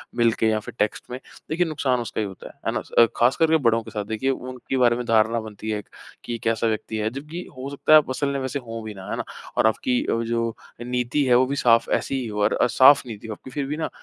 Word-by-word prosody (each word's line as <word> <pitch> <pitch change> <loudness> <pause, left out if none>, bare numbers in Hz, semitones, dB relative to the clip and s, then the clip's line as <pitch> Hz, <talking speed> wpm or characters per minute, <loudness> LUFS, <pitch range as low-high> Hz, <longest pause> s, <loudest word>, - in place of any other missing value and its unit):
मिलके 115 -2 +2
या 110 0 +1
फिर - - -10
टेक्स्ट 105 0 0
में, 125 - -5 0.3
देखिए 170 +3 +1
नुकसान 140 -5 0
उसका 115 -1 -3
ही 105 - -2
होता 95 - -10
है, - - -13
है - - +1
ना? - - -2
स - - -17
अ, 115 - +9
खास 120 +3 +4
करके 160 0 +4
बड़ों 115 -4 +2
के - - -11
साथ। 105 -2 -4
देखिए, 110 +5 -2
उनके 130 0 -4
बारे 120 -2 +4
में 125 - -4
धारणा 115 0 +3
बनती 110 0 -8
है 105 - -1
एक 105 - -14 0.3
कि, 120 -1 -4
"कैसा 115 0 +1
व्यक्ति 110 0 -2
है?" 110 +1 0
जबकि 150 +8 -7
हो 135 +2 -5
सकता 140 +2 -2
है - - +11
आप 150 - +2
असल 140 +2 -1
में 140 - -1
वैसे 130 +1 -3
हों 115 0 -6
भी 110 - -6
ना, 95 -1 -10
है - - -2
ना? - - -2 0.3
और - - +5
आपकी 125 +3 +1
वो 115 0 0
जो 115 0 0 0.3
अ, - - -4
नीति 125 +3 0
है, 125 -2 +4
वो 130 +1 +5
भी 140 - -2
साफ़ 115 -1 +5
ऐसी - - -4
ही 120 - -4
हो 105 -1 -3
और 105 - +3
अ, - - +2
साफ़ 140 +2 +8
नीति 110 0 -8
हो 110 - -4
आपकी 130 - -12
फिर 140 +1 -2
भी 150 +2 -4
ना 160 - -2
120 Hz, 285 wpm, -23 LUFS, 110-135 Hz, 0.3 s, है